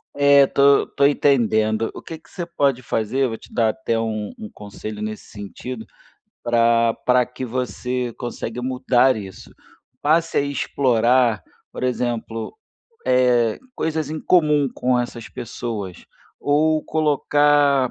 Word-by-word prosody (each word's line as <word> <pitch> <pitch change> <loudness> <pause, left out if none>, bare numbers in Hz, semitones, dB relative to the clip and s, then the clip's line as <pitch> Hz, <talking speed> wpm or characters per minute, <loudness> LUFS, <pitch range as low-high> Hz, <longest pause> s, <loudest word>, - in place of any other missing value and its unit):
É, 140 -1 +6
tô 140 +1 +4
tô 140 - +1
entendendo. 115 -6 +2
O - - -9
que 165 - -8
que 160 - -24
você 175 - -5
pode 140 -7 0
fazer, 125 +4 -1
vou 115 -1 -5
te - - -17
dar 115 -2 +2
até 115 -1 -2
um 110 -2 -3
um 105 - -7
conselho 105 +1 -8
nesse 110 0 -5
sentido, 110 +3 -8 0.6
pra 115 -1 +3
pra 125 0 +4
que 125 +1 -7
você 125 0 -3
consegue 120 -1 -5
mudar 130 0 +2
isso. 95 -3 -9 0.5
Passe 165 +3 +2
a - - +4
explorar, 125 -4 +1 0.3
por - - -6
exemplo, 120 - -3 0.5
eh, 125 -3 +3 0.2
coisas 155 -2 -2
em 155 0 -4
comum 150 -5 +3
com 125 0 +1
essas 120 -1 -5
pessoas 110 -6 -6 0.3
ou 155 +2 +2
colocar 145 -3 +2
125 Hz, 135 wpm, -21 LUFS, 115-140 Hz, 0.6 s, É